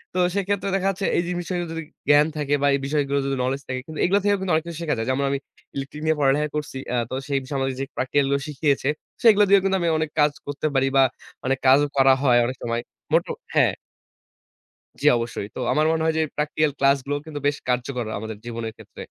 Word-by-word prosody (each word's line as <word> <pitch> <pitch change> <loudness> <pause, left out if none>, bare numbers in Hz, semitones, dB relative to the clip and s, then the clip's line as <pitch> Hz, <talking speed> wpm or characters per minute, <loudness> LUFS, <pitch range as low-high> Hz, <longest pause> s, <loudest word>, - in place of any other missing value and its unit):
তো - - +1 0.2
সেক্ষেত্রে 200 0 -1
দেখা 195 0 0
যাচ্ছে 195 0 -2
এই 170 - +2
জিনিসটাতে 175 0 -2
যদি 165 0 -4 0.3
জ্ঞান 145 +1 +6
থাকে 145 -1 -1
বা 145 - +3
এই 140 - -1
বিষয়গুলো 140 -1 0
যদি 135 0 -1
knowledge 135 +2 -1
থাকে 130 0 -3
কিন্তু 155 -1 -7
এগুলো 195 +3 +3
থেকেও 205 -1 +3
কিন্তু 190 -2 -2
অনেক 160 - +1
কিছু 170 - -6
শেখা 155 -5 0
যায়। 115 +2 -3
যেমন 135 +2 +1
আমি 140 - 0 0.4
electric 140 +2 -6
নিয়ে 160 0 +3
পড়ালেখা 145 +2 +3
করছি। 150 -3 -4 0.2
আ - - +2
তো 130 - -3
সেই 140 -1 +1
বিষয় 135 +1 -4
আমাকে 135 0 -1
যে 135 - -1
practical 135 +2 +1
গুলো 140 - +2
শিখিয়েছে 145 -2 0 0.3
সেগুলো 210 -3 +7
দিয়েও 200 -1 +6
কিন্তু 195 0 +2
আমি 170 - +1
অনেক 155 -1 -1
কাজ 150 0 +5 0.2
করতে 145 +2 -2
পারি 135 0 +3
বা 135 - +7 0.4
অনেক 135 0 +1
কাজও 145 +3 +6
করা 135 0 +6
হয় 125 -3 +5
অনেক 130 - -3
সময়। 115 0 -1 0.3
মটা - - +2 0.2
হ্যাঁ। - - +4 1.3
জ্বি, - - +1
অবশ্যই। 115 -3 -4
তো - - -5
আমার 155 +1 +2
মনে 160 0 0
হয় 160 0 +1
যে 160 - +3 0.2
practical 150 0 +1
ক্লাসগুলোও 140 +1 +1
কিন্তু 155 -2 -6
বেশ 145 0 0
কার্যকর 125 0 -1
আমাদের 110 0 -6
জীবনের 115 -2 -5
ক্ষেত্রে। - - -15
145 Hz, 220 wpm, -23 LUFS, 135-160 Hz, 1.3 s, সেগুলো